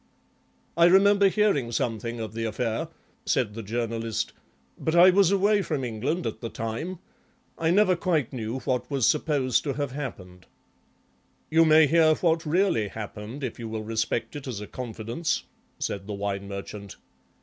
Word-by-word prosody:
"I 170 +1 +5
remember 200 +2 +6
hearing 190 - +1
something 115 0 -2
of 110 -2 -5
the 115 0 -3
affair," 115 +1 -2 0.4
said 115 -5 0
the 115 - -6
Journalist, 115 0 -3 0.4
"but 160 - -2
I 180 +2 +8
was 195 -1 +4
away 200 +1 +3
from 150 -7 -2
England 130 +9 -2
at - - -4
the 115 - -4
time. 115 +14 -4 0.6
I 160 - 0
never 185 +1 +4
quite 165 -8 0
knew 120 +1 -4
what 125 -1 -2
was 135 -5 +1
supposed 145 -5 +2
to 140 - -1
have 140 -1 -3
happened." 95 - -7 1.0
"You 165 +1 +5
may 155 0 +7
hear 155 +1 +4
what 165 -1 +1
really 165 - +2
happened 105 +5 -7
if 125 -2 -4
you 115 -1 -5
will 110 0 -4
respect 110 +2 -2
it 145 -2 -7
as 120 -6 -4
a 105 - -6
confidence," 120 +6 -3 0.3
said 100 0 -4
the 105 - -4
Wine 100 0 -3
Merchant. 100 0 -7
125 Hz, 160 wpm, -26 LUFS, 110-165 Hz, 1.0 s, I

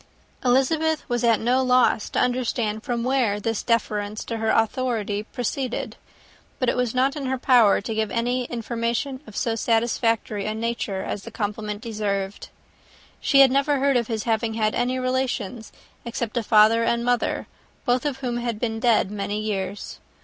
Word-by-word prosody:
Elizabeth 305 +5 +2
was 240 -1 -1
at 230 -2 +4
no 250 +3 +2
loss 250 -4 +3
to - - -5
understand 240 -3 0
from 235 0 -2
whence 240 -6 +1
this 225 -2 -1
deference 215 -2 -1
for 230 - -4
her 220 0 -1
authority 225 -3 0
proceeded; 245 +2 -3 0.6
but 255 - -1
it - - +2
was 250 -1 -1
not 265 +3 +2
in 280 -3 -4
her 265 0 0
power 245 -5 +4
to 225 - -4
give 220 -1 -1
any 245 +3 -1
information 235 +3 -3
of 215 - -12
so 230 - 0
satisfactory 225 -2 0
a 215 - -2
nature 220 -4 -2
as 205 - -4
the - - -9
compliment 210 0 -4
deserved. 205 -3 -3 0.7
She 275 - +5
had 270 -2 +7
never 280 +2 +2
heard 275 0 +2
of 235 -2 +1
his 220 -3 -2
having 225 -1 0
had 215 -1 +1
any 250 +1 0
relations, 255 -4 -2 0.3
except 235 -1 -4
a 240 - +1
father 220 +1 +5
and 235 +1 0
mother, 245 -1 0 0.4
both 245 -1 +2
of 275 -3 -3
whom 245 -2 -2
had 235 -3 -3
been 225 -2 -2
dead 230 -4 +2
many 205 0 -3
years. 205 -2 -4
235 Hz, 170 wpm, -24 LUFS, 215-255 Hz, 0.7 s, had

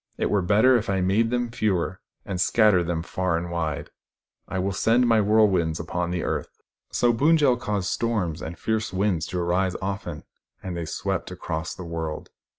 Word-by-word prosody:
It - - 0
were 105 - +3
better 105 +8 +4
if 115 - -3
I 95 -1 +1
made 100 +5 +2
them 120 -1 -1
fewer, 95 -4 -1 0.2
and 95 -2 -2
scattered 100 -5 +4
them 80 -2 -1
far 95 -1 -1
and 85 +1 -4
wide. 80 -4 -3 0.6
I - - -4
will 95 +2 0
send 115 +5 +3
my 115 -1 +4
whirlwinds 100 -6 +3
upon 85 +1 -2
the 90 -1 -2
earth." - - -2 0.4
So 120 -1 +2
Pund 150 +8 +4
jel 140 -5 +4
caused 105 -5 -2
storms 100 -8 -1
and 80 +1 -6
fierce 110 -1 -1
winds 95 -3 0
to 90 - -3
arise 90 +2 0
often, 95 -5 -4 0.4
and 95 -2 -4
they 85 -1 -3
swept 95 +3 -3
across 80 -3 -4
the 90 - -8
world. 80 -2 -5
95 Hz, 185 wpm, -25 LUFS, 85-110 Hz, 0.6 s, better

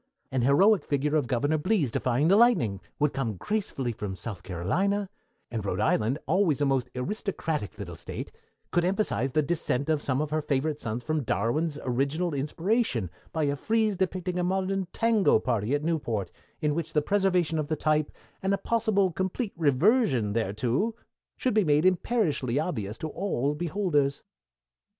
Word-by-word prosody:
An 130 -1 0
heroic 185 - +5
figure 145 +1 0
of 145 -5 +1
Governor 145 +6 +1
Blease 170 - +1
defying 125 +6 +1
the 190 - +5
lightning 165 - +4 0.2
would 150 -1 +1
come 120 -6 -2
gracefully 190 - -2
from 105 -3 -5
South 100 -2 -6
Carolina, 185 - -1 0.4
and 115 -3 -3
Rhode 100 - -2
Island, 110 +4 +2
always 170 -4 +2
a 145 - +2
most 135 -3 +1
aristocratic 160 - -3
little 90 -5 -7
State, 85 - -6 0.4
could 175 - +2
emphasize 175 - +1
the 155 - +3
descent 145 -2 -1
of 155 -2 +2
some 130 -2 0
of 150 0 -2
her 155 0 +1
favorite 145 +1 -1
sons 115 +2 -4
from 155 -1 0
Darwin's 140 - 0
original 140 +7 0
inspiration 145 - 0 0.2
by 160 - -1
a 140 -1 +1
frieze 220 +5 +1
depicting 185 -1 -1
a - - +1
modern 190 +1 0
tango 225 - +3
party 110 +2 0
at 145 - -2
Newport, 120 - -1 0.3
in 150 -2 +1
which 165 +1 -3
the 150 - +2
preservation 180 -5 +1
of 150 - -2
the 155 - 0
type, 155 -1 +1 0.3
and 195 +1 +2
a - - -4
possible 205 -3 +1
complete 190 +5 -2
reversion 150 - +3
thereto, 115 - 0 0.4
should 255 - 0
be 215 -1 +4
made 150 0 +3
imperishably 170 - +1
obvious 115 - -2
to 160 - -4
all 150 -6 -1
beholders. 150 -4 0
150 Hz, 165 wpm, -27 LUFS, 125-190 Hz, 0.4 s, heroic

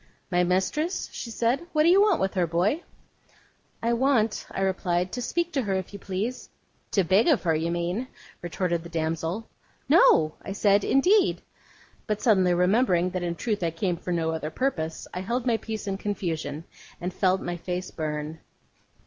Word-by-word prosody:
'My 180 0 +3
mistress?' 190 - 0
she 235 - -6
said. 240 +8 0
'What 305 -1 +4
do 330 - +5
you 380 +3 +6
want 415 -4 +4
with 190 0 0
her, 180 -3 +1
boy?' 180 - +1 1.0
'I 235 +1 +2
want,' 235 -3 +1
I - - -4
replied, 180 -1 0
'to 245 - -4
speak 345 +7 -1
to 275 - +1
her, 200 -5 -1
if 190 +1 -4
you 200 - -7
please.' 200 +7 -4 0.4
'To 195 - +2
beg 190 +6 +3
of 305 -8 +3
her, 165 -3 +2
you 160 +2 0
mean,' 175 +8 -2 0.3
retorted 175 0 -1
the 170 - -10
damsel. 165 +5 -2 0.4
'No,' 165 - +5
I 195 - -6
said, 200 0 +3
'indeed.' 370 +9 +3 0.6
But 210 -1 -1
suddenly 190 -6 +3
remembering 180 -1 +3
that 185 -1 -3
in 170 -1 -2
truth 210 +1 -2
I 170 - +1
came 175 +2 -1
for 180 +1 -6
no 165 -2 0
other 160 -1 -3
purpose, 160 - -2
I 180 - -3
held 235 +6 -2
my 235 -3 +2
peace 220 -1 -6
in 195 -1 -2
confusion, 165 -7 -3 0.4
and 180 +1 -4
felt 190 0 +2
my 175 -1 -4
face 180 +2 -4
burn. 155 0 -4
190 Hz, 185 wpm, -26 LUFS, 170-230 Hz, 1.0 s, you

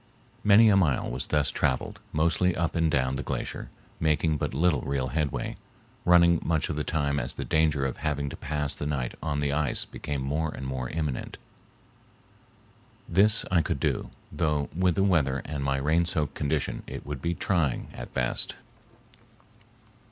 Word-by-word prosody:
Many 105 +2 +7
a 100 - +5
mile 80 -12 +2
was 60 +1 -4
thus 75 -2 +2
traveled, 65 - -1
mostly 85 +3 +2
up 85 -1 -1
and 80 -1 +2
down 65 -2 +1
the - - -2
glacier, - - -4 0.3
making 80 0 +1
but - - -2
little 75 -2 +2
real 70 -2 -2
headway, 75 +1 -2 0.5
running 85 -1 +5
much 80 -3 0
of - - -2
the 75 - -1
time 70 -3 0
as - - -1
the - - -4
danger 75 -3 +2
of 65 - -3
having 70 -2 -2
to - - -7
pass 75 -1 -2
the 75 - -4
night 65 -5 -2
on 75 -2 -1
the 70 -1 0
ice 75 -3 +3
became 70 -2 -5
more 75 +4 -1
and 65 - -7
more 65 -2 -3
imminent. 75 -5 -3 1.7
This 105 +5 +4
I 90 -2 +4
could - - -2
do, - - -1 0.2
though 75 -2 0
with 90 -1 +2
the 95 - +2
weather 75 -9 +2
and 70 -1 -4
my 70 0 +1
rain 80 +5 +2
soaked 75 -4 -1
condition 75 0 -1
it - - -7
would 75 -3 -5
be 85 +3 -1
trying 80 -10 0
at - - -8
best. 60 -1 0
75 Hz, 175 wpm, -27 LUFS, 70-85 Hz, 1.7 s, Many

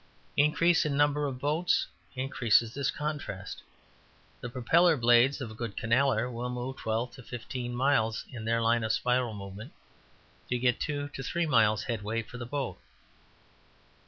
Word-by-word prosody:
Increase 165 +3 +4
in 145 -2 -1
number 145 0 +2
of 130 -2 -4
boats 150 +6 +1 0.3
increases 120 -3 +2
this 140 -1 -1
contrast. 140 -11 -4 0.8
The 125 - -6
propeller 160 +7 +3
blades 120 +3 +4
of 120 -4 -5
a - - -8
good 110 -2 -6
canaller 120 0 +2
will 120 +1 -3
move 125 +2 -4
twelve 115 +2 -2
to - - -11
fifteen 120 +1 -6
miles, 125 -4 +1
in 120 -4 -7
their 115 +1 +1
line 115 0 +2
of 110 - 0
spiral 125 -2 0
movement, 100 +1 -9 0.8
to 125 - +1
get 125 0 +1
two 145 -1 -2
to 135 - -7
three 170 +5 -1
miles 110 -7 +3
headway 115 -1 -2
for 125 +3 -10
the 120 - -6
boat. 140 -1 -3
125 Hz, 160 wpm, -29 LUFS, 115-140 Hz, 0.8 s, Increase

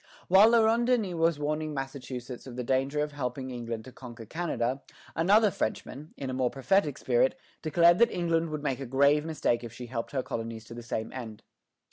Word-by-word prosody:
While 195 +4 +8
La 230 -1 +5
Ronde 230 +2 +2
Denys 225 -8 +1
was 165 -1 +2
warning 150 +1 -2
Massachusetts 130 -2 -6
of 125 - -8
the 125 - -3
danger 135 +4 0
of 150 0 -2
helping 130 -2 -4
England 115 -2 -5
to 130 - -10
conquer 120 -3 -10
Canada, 135 -3 -2 0.3
another 205 +6 +4
Frenchman, 140 +5 -4
in 135 - -5
a 130 - -3
more 130 -1 +1
prophetic 145 +2 +1
spirit, 125 +1 +1 0.2
declared 170 +3 +4
that 235 - +6
England 165 -2 0
would 155 -1 -5
make 135 -3 -1
a 135 - -5
grave 140 +4 +3
mistake 150 -7 0
if 115 - -7
she 125 +2 -8
helped 115 -1 -4
her 135 -3 -2
colonies 115 -1 -5
to 115 - -10
the 120 - -7
same 110 -1 -4
end. 115 -5 -8
135 Hz, 200 wpm, -29 LUFS, 125-165 Hz, 0.3 s, While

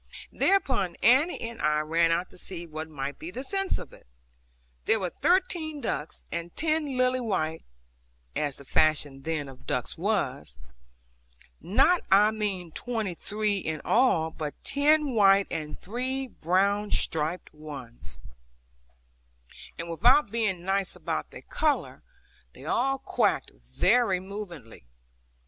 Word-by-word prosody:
Thereupon 260 - +2
Annie 270 +9 +5
and 230 0 -6
I 150 0 +2
ran 165 +2 +2
out 175 +2 0
to - - -15
see 175 -2 -6
what 155 0 -6
might 140 -2 -5
be 160 - -6
the 250 +8 -6
sense 390 +4 0
of - - -9
it. - - -17 0.8
There 225 - +3
were 180 -3 -2
thirteen 345 -4 +1
ducks, 155 - -4
and 170 0 -5
ten 310 -4 0
lily 255 0 +3
white 160 -9 -1 0.7
(as 145 -2 -1
the 140 - -12
fashion 145 -2 +2
then 155 -1 -2
of 135 -1 -13
ducks - - -2
was), - - -1 1.0
not 335 - +4
I 205 +2 +6
mean 200 -6 -3
twenty 220 -2 -2
three 210 +3 -1
in 160 -3 -3
all, 175 -10 +3
but 150 -2 -5
ten 290 0 +3
white 200 -2 +5
and 155 -2 -4
three 255 +6 -3
brown 200 0 +1
striped 160 +1 0
ones; 135 - -9 1.6
and 170 - -5
without 235 - +4
being 210 -6 -1
nice 195 0 0
about - - -3
their - - -11
colour, 305 -2 -1 0.5
they - - -13
all 270 +2 +1
quacked 265 - 0
very 185 - +2
movingly. 180 - -9
195 Hz, 135 wpm, -28 LUFS, 160-250 Hz, 1.6 s, I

